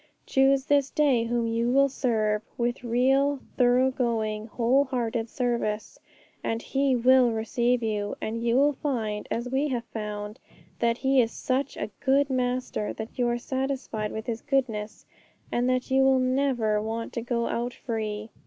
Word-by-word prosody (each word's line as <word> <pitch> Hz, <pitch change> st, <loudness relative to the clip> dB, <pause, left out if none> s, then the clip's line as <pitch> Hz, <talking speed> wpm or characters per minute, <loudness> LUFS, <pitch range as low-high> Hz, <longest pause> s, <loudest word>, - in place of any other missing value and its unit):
Choose 270 Hz, 0 st, +3 dB
this 285 Hz, -2 st, +2 dB
day 270 Hz, -6 st, +2 dB
whom 235 Hz, 0 st, 0 dB
you 230 Hz, +1 st, 0 dB
will 275 Hz, +2 st, +4 dB
serve 220 Hz, -6 st, 0 dB, 0.2 s
with 240 Hz, +1 st, -1 dB
real, 270 Hz, +4 st, +2 dB, 0.2 s
thorough 250 Hz, +1 st, +4 dB
going, 220 Hz, -4 st, -1 dB
whole 250 Hz, +5 st, +2 dB
hearted 235 Hz, -3 st, -2 dB
service, 235 Hz, -, -2 dB, 0.4 s
and 225 Hz, -, -1 dB
He 270 Hz, +2 st, +1 dB
will 250 Hz, +1 st, +5 dB
receive 235 Hz, +2 st, 0 dB
you; 210 Hz, -2 st, -2 dB
and 230 Hz, +1 st, -3 dB
you 235 Hz, 0 st, +2 dB
will 285 Hz, +3 st, +4 dB
find, 225 Hz, -7 st, -3 dB
as 235 Hz, +1 st, -2 dB
we 275 Hz, +3 st, +1 dB
have 245 Hz, -4 st, -2 dB
found, 210 Hz, -1 st, -5 dB, 0.4 s
that 235 Hz, 0 st, +1 dB
He 265 Hz, 0 st, +3 dB
is 230 Hz, -1 st, -1 dB
such 265 Hz, +2 st, -2 dB
a 210 Hz, -, -4 dB
good 275 Hz, +1 st, +3 dB
Master 250 Hz, -4 st, -1 dB
that 220 Hz, +4 st, -8 dB
you 245 Hz, -, +3 dB
are 240 Hz, 0 st, 0 dB
satisfied 260 Hz, -4 st, -3 dB
with 220 Hz, 0 st, -5 dB
His 230 Hz, -1 st, -3 dB
goodness, 235 Hz, -7 st, -2 dB, 0.5 s
and 245 Hz, +1 st, +1 dB
that 255 Hz, 0 st, -1 dB
you 265 Hz, 0 st, +4 dB
will 265 Hz, 0 st, +5 dB
never 255 Hz, -5 st, +1 dB
want 225 Hz, +1 st, -4 dB
to 235 Hz, -, -2 dB
go 235 Hz, 0 st, -1 dB
out 240 Hz, +1 st, -2 dB
free. 215 Hz, -2 st, -4 dB
240 Hz, 165 wpm, -26 LUFS, 225-265 Hz, 0.5 s, will